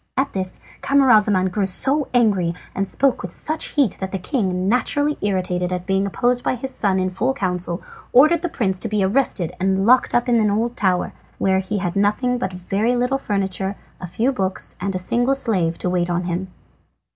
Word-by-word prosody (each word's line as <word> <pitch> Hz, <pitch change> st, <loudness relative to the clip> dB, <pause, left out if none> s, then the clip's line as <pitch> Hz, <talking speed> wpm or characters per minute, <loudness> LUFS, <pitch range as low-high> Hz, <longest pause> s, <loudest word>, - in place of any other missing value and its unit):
At 270 Hz, +1 st, 0 dB
this 185 Hz, -1 st, -3 dB, 0.2 s
Camaralzaman 215 Hz, -9 st, +4 dB
grew 195 Hz, 0 st, 0 dB
so 275 Hz, +9 st, 0 dB
angry 200 Hz, -9 st, +2 dB, 0.2 s
and 195 Hz, 0 st, -2 dB
spoke 275 Hz, -2 st, +1 dB
with 180 Hz, -, -6 dB
so 310 Hz, -, -2 dB
much 315 Hz, -, -1 dB
heat 275 Hz, -, +1 dB
that 190 Hz, 0 st, -4 dB
the 195 Hz, -, -2 dB
king, 185 Hz, -3 st, -1 dB
naturally 290 Hz, +6 st, +2 dB
irritated 180 Hz, -2 st, -1 dB
at 180 Hz, 0 st, -3 dB
being 195 Hz, +1 st, +1 dB
opposed 245 Hz, +5 st, 0 dB
by -, -, 0 dB
his 265 Hz, +2 st, -4 dB
son 195 Hz, -3 st, +1 dB
in 185 Hz, 0 st, 0 dB
full 250 Hz, +8 st, -1 dB
council, 180 Hz, -4 st, -2 dB, 0.3 s
ordered 310 Hz, +6 st, +5 dB
the 350 Hz, -, -2 dB
prince 190 Hz, -10 st, -1 dB
to 225 Hz, -, -3 dB
be 210 Hz, -1 st, +1 dB
arrested 195 Hz, -5 st, +1 dB
and 190 Hz, +1 st, +1 dB
locked 255 Hz, +3 st, +4 dB
up 240 Hz, +1 st, +2 dB
in 240 Hz, -2 st, +3 dB
an 215 Hz, -1 st, +2 dB
old 230 Hz, +4 st, -1 dB
tower, 185 Hz, -3 st, 0 dB, 0.2 s
where 190 Hz, 0 st, +2 dB
he 190 Hz, +2 st, -3 dB
had 180 Hz, -2 st, -3 dB
nothing 210 Hz, +5 st, +1 dB
but 190 Hz, -, -2 dB
a -, -, -7 dB
very 205 Hz, +7 st, 0 dB
little 250 Hz, +3 st, 0 dB
furniture, 195 Hz, -3 st, -2 dB, 0.2 s
a 180 Hz, -, -6 dB
few 230 Hz, +10 st, 0 dB
books, 190 Hz, -7 st, -3 dB
and 195 Hz, 0 st, -2 dB
a -, -, +1 dB
single 240 Hz, +8 st, +1 dB
slave 185 Hz, -11 st, +1 dB
to -, -, -3 dB
wait 180 Hz, -1 st, 0 dB
on 175 Hz, +1 st, -1 dB
him. 180 Hz, +2 st, -3 dB
200 Hz, 205 wpm, -21 LUFS, 185-245 Hz, 0.3 s, ordered